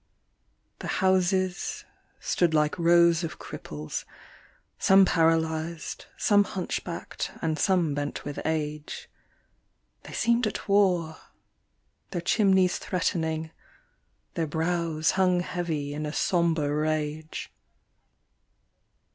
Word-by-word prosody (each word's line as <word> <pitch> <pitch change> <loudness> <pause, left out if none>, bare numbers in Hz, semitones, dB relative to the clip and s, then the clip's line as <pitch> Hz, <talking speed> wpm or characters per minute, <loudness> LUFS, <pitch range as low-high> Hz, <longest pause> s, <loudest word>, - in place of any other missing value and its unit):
The - - -6 0.2
houses 185 0 +1 0.3
stood 170 -3 +1
like 150 +3 +1
rows 170 0 +5
of 165 - -4
cripples, 75 0 -6 0.8
some 190 0 +6
paralysed, 160 -1 0
some 205 -2 +4
hunch 190 -3 -3
backed 170 -2 -5
and 160 -1 -1
some 175 -6 +2
bent 145 0 -4
with 145 -1 -5
age, 150 -1 -3 0.9
They - - -11
seemed 235 0 +2
at 210 - -5
war, 180 -6 +2 0.9
their 180 - -3
chimneys 190 -1 +3
threatening, 160 -3 -1 0.8
their 165 -2 -1
brows 160 0 0
hung 180 -2 +2
heavy 160 -5 -3
in 150 +1 -3
a 150 - -5
sombre 165 -5 +1
rage. 155 0 -2
165 Hz, 100 wpm, -27 LUFS, 155-180 Hz, 0.9 s, some